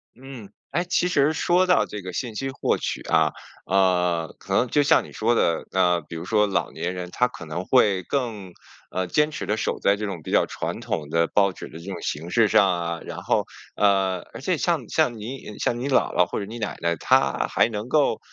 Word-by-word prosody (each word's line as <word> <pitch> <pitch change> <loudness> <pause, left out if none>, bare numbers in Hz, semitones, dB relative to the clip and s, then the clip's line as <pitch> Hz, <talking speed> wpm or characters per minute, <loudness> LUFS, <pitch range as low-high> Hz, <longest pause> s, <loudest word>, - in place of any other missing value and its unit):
嗯， 125 -5 -11 0.2
哎， 170 +5 0
其 180 0 +1
实 150 -3 +2
说 175 +3 +2
到 180 - +4
这 105 - -7
个 90 0 -6
信 120 0 -4
息 135 +4 -3
获 135 - 0
取 - - -3
啊， - - +2 0.4
呃， 90 -3 +1
可 95 - -5
能 125 - +3
就 145 +4 +2
像 140 - +4
你 - - -13
说 115 +2 +1
的， 85 -7 +1
呃， 90 -2 +2
比 85 +1 -10
如 80 - -6
说 105 +1 +2
老 100 - -1
年 90 +2 -3
人， 90 -1 -5
他 125 - +2
可 100 -8 -10
能 80 +3 -4
会 105 -7 +3
更， 110 -8 -3 0.4
呃， 95 - -1
坚 150 +10 +2
持 155 - -5
地 105 - 0
守 - - -2
在 100 - +3
这 105 +1 -4
种 90 -5 -5
比 - - -7
较 - - +4
传 - - -4
统 75 -2 -3
的 85 0 +2
报 100 -1 +3
纸 - - -9
的 - - -11
这 85 - -12
种 - - -6
形 80 +4 -4
式 115 +2 +4
上 100 0 +5
啊， 85 -1 -3
然 - - -7
后， - - +1 0.3
呃， 95 -2 +2
而 - - -8
且 - - 0
像 - - -1
像 120 -2 +1
你 110 -1 -7
像 120 - 0
你 130 - -3
姥 135 - +2
姥 90 - +5
或 - - -3
者 100 - -4
你 110 +4 -8
奶 110 -2 -4
奶， 85 0 +1
她 - - +2
还 - - +2
能 110 +1 -5
够 150 +1 +2
105 Hz, 250 characters per minute, -24 LUFS, 90-125 Hz, 0.4 s, 上